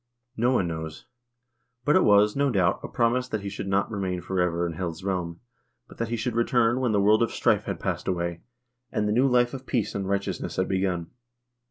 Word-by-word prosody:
No 120 +3 +2
one 95 -9 +2
knows; 80 -1 -6 0.8
but 150 - +4
it 185 - +5
was, 105 0 +5
no 140 0 +2
doubt, 95 -6 +2
a - - -5
promise 125 +1 +1
that 110 -4 -3
he 100 - -4
should 100 0 -6
not 100 +3 +1
remain 95 -4 -2
forever 90 -1 0
in 85 - -3
Hel's 85 0 -5
realm, 90 -3 -3 0.5
but - - -16
that 115 - -1
he 120 - -2
should 120 +1 -2
return 120 +1 +2
when 125 -3 +1
the 105 - +2
world 105 +2 +4
of 115 - +2
strife - - +1
had - - -4
passed - - -3
away, 85 -2 -2 0.5
and 105 -1 0
the - - +1
new 125 +4 +4
life 125 -1 +3
of 130 -1 -8
peace 110 -5 -1
and 95 -1 -3
right 100 0 +1
eousness - - -5
had - - +1
begun. 95 -3 -1
100 Hz, 220 wpm, -26 LUFS, 90-120 Hz, 0.8 s, it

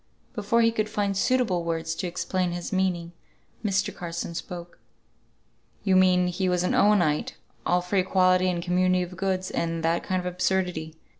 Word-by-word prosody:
Before 230 0 +1
he 230 - +4
could 215 -1 -1
find 200 -2 -1
suitable 200 -5 +1
words 165 -1 -2
to 180 - -3
explain 180 0 -1
his 175 +1 -5
meaning, 180 -3 0 0.5
Mr. 195 -2 0
Carson 170 -1 -5
spoke. 175 0 -7 1.0
"You 190 -2 +3
mean 185 -1 +5
he 185 +1 -1
was 180 0 +1
an 180 - 0
Owenite; 175 -8 +3 0.3
all 180 0 +3
for 180 +3 -2
equality 185 0 +3
and 175 -1 -2
community 185 +1 +2
of 180 +1 -8
goods, 185 0 -2
and 165 -1 -2
that 165 +1 +1
kind 185 0 -1
of 180 - -6
absurdity." 180 -3 -1
180 Hz, 165 wpm, -26 LUFS, 175-190 Hz, 1.0 s, mean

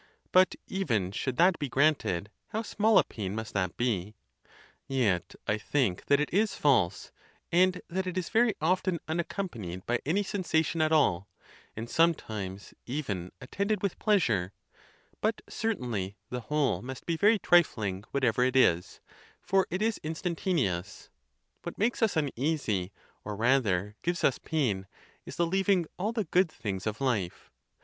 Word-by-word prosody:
But 185 0 +5
even 115 - -1
should 125 +5 -3
that 175 +1 +4
be 145 -3 -2
granted, 125 - +1 0.2
how 220 0 -3
small 215 0 +3
a - - +7
pain 100 -2 -5
must 110 -1 -5
that 95 -3 -1
be! 105 -4 -1 0.7
Yet 115 -10 0
I 105 - +1
think 115 -5 0
that 140 - +4
it 150 - -1
is 210 +3 +2
false, 105 -11 +2 0.4
and 180 +1 +4
that 185 +2 -2
it 185 0 -3
is 185 - -2
very 230 -1 +3
often 180 +2 +1
unaccompanied 160 - -4
by 120 0 0
any 185 +8 +1
sensation 170 -5 0
at 155 0 +2
all, 100 - +3 0.5
and 115 +2 -5
some 165 +5 +4
times 100 -4 -7
even 100 - -3
attended 200 +9 -2
with 200 - -1
pleasure; 115 - +2 0.7
but 215 0 0
certainly 120 - -3
the 125 0 -3
whole 145 +4 0
must 130 +1 -8
be 170 - 0
very 210 +6 +4
trifling, 110 - +2
whatever 125 -3 +1
it 130 +1 +1
is, 90 -9 +3 0.4
for 190 +1 +1
it 185 +4 -1
is 225 -1 0
instantaneous, 155 - -2 0.5
What - - -7
makes 230 +4 0
us 220 -7 +2
uneasy, 135 - -1 0.3
or 105 0 -5
rather 105 -4 +1
gives 175 +1 -1
us 135 - +3
pain, 110 -12 -1 0.4
is - - -7
the 170 - +2
leaving 190 0 +2
all 205 +4 0
the 230 -2 -1
good 185 -2 +2
things 100 -6 -4
of 110 +4 -3
life. 110 -10 -2
140 Hz, 155 wpm, -29 LUFS, -, 0.7 s, a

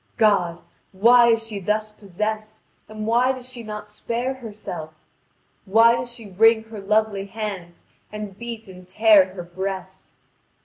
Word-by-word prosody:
God! 180 -6 +2 0.3
why 235 +5 +6
is 225 -1 +2
she 215 -3 -5
thus 215 +3 -1
possessed, 215 +2 -5 0.3
and 215 0 -6
why 245 +4 +3
does 255 -1 -8
she 255 -2 -7
not 210 -1 -7
spare 235 +4 -3
herself? 205 -10 -8 0.7
Why 225 +4 +5
does 240 0 -4
she 225 -4 -9
wring 220 +3 +4
her 215 -3 -7
lovely 210 -1 0
hands 195 -5 -6 0.3
and 210 -2 -7
beat 230 0 -7
and 185 -1 -13
tear 195 -1 +5
her 175 - -6
breast? 190 +1 -6
215 Hz, 145 wpm, -23 LUFS, 195-225 Hz, 0.7 s, why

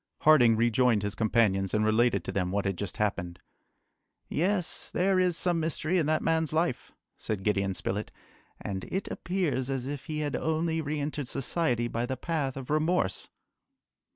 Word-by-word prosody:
Harding 125 -7 +6
rejoined 115 -1 +3
his 105 -1 -2
companions 105 -3 +1
and 105 0 +2
related 110 -3 +2
to - - -4
them 90 -2 -1
what 100 +2 -1
had 95 -1 0
just 100 +3 -5
happened. 90 -5 -1 0.9
"Yes! 180 +2 0
there 190 +1 +2
is 180 -2 +2
some 175 -2 +1
mystery 165 +2 0
in 155 - 0
that 155 0 +1
man's 160 -1 +1
life," 160 -4 -1 0.3
said 105 -3 -3
Gideon 100 -2 0
Spilett, 105 +3 -3 0.5
"and 95 -2 -4
it 190 +1 -4
appears 170 -8 -1
as 135 -2 -2
if 140 0 -5
he 155 -2 -3
had 145 -1 -2
only 160 +1 0
re 150 0 -3
entered 145 -2 -3
society 125 -3 0
by 120 +1 -2
the 130 - -3
path 140 -3 -2
of 135 +1 -6
remorse." 155 - 0
130 Hz, 170 wpm, -28 LUFS, 105-160 Hz, 0.9 s, Harding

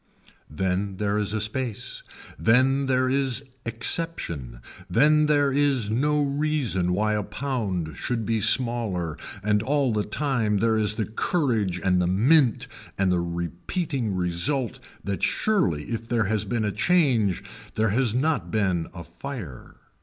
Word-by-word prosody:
Then 95 +4 -2
there 105 +1 0
is 105 -1 +1
a - - 0
space, 110 +1 -2 0.4
then 130 - +3
there 130 0 +2
is 135 0 0 0.2
exception, 115 - -3 0.3
then 150 +4 +4
there 145 -2 +3
is 135 -6 +1
no 145 +5 +2
reason 140 -11 0
why 110 +3 +1
a 105 - 0
pound 100 - -3
should 115 -3 -2
be 115 0 0
smaller 105 - +1 0.3
and 105 0 +2
all 135 0 +1
the 105 -1 +1
time 115 -4 0
there 110 +2 +2
is 105 -1 +1
the 110 -1 -1
courage 110 - 0
and 90 -1 +3
the 90 - +1
mint 120 - +3 0.3
and 95 -1 +2
the 90 - +2
repeating 90 - -3
result 95 +9 -1 0.2
that 100 0 -3
surely 170 - +1
if 115 0 -4
there 115 -2 +2
has 105 +1 0
been 115 -3 -1
a 105 - 0
change 115 - +2 0.3
there 110 0 +2
has 115 +1 +1
not 155 +5 0
been 95 -6 0
a 85 - -7
fire. 105 - -8
110 Hz, 145 wpm, -25 LUFS, 95-135 Hz, 0.4 s, then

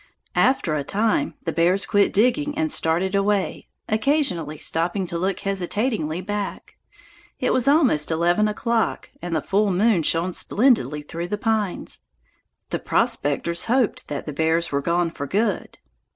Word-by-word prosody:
After 255 - +2
a 150 -2 -1
time 220 - 0
the - - -2
bears 180 +4 +2
quit 205 -2 +2
digging 255 +7 +1
and 315 -1 0
started 175 +1 +1
away, 200 0 0 0.2
occasionally 215 - 0
stopping 175 +5 0
to 170 -1 -4
look 190 +2 -1
hesitatingly 195 -3 -1
back. 205 +1 -5 0.6
It - - +1
was 255 0 +1
almost 275 - +3
eleven 175 +6 +2
o'clock, 230 +2 -1
and 175 -2 -3
the 155 - -1
full 205 +1 +1
moon 195 0 +3
shone 165 +3 +1
splendidly 170 - +1
through 170 +3 -5
the 210 - -2
pines. 215 -3 -2 0.7
The - - -1
prospectors 155 +4 0
hoped 245 -2 0
that 145 -1 -5
the 150 - -5
bears 160 +3 +1
were 140 0 0
gone 170 +2 0
for 145 -3 -6
good. 205 +4 -1
190 Hz, 150 wpm, -23 LUFS, 165-220 Hz, 0.7 s, almost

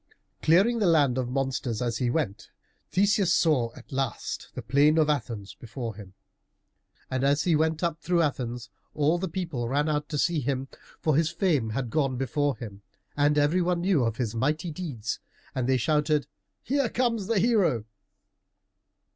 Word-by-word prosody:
Clearing 195 +9 +4
the 205 - +2
land 145 -6 +3
of 125 -1 -2
monsters 130 -3 -2
as 120 -2 -1
he 125 - +1
went, 120 -7 -2 0.4
Theseus 200 -1 +2
saw 135 -8 +3
at - - -14
last 135 0 -3
the - - -5
plain 145 +3 +4
of 155 -1 +4
Athens 115 -9 -4
before 120 -1 -6
him. 95 -2 -12 1.0
And 130 0 -1
as 145 +2 +3
he 170 -3 +3
went 160 +2 +1
up 165 -1 0
through 170 0 +1
Athens 125 -5 -3 0.2
all 155 +3 +2
the 190 0 -2
people 160 -10 -3
ran 145 +3 +1
out 150 -1 -1
to 150 - -2
see 170 +2 +1
him, 135 0 -2 0.3
for 155 -3 +1
his 160 +1 +3
fame 155 - +1
had 120 +1 -3
gone 135 -5 0
before 140 0 0
him, 105 -3 -9 0.3
and 145 +1 +3
every 150 +5 +3
one 175 0 0
knew 175 -7 +2
of 115 -1 -1
his 120 -4 -2
mighty 150 +8 -1
deeds, 140 - -4 0.3
and 130 -1 -1
they 130 - +4
shouted, 150 +3 +1 0.4
"Here 275 -2 +1
comes 230 -5 0
the 230 -1 +1
hero!" 190 - +2
145 Hz, 170 wpm, -27 LUFS, 125-170 Hz, 1.0 s, Clearing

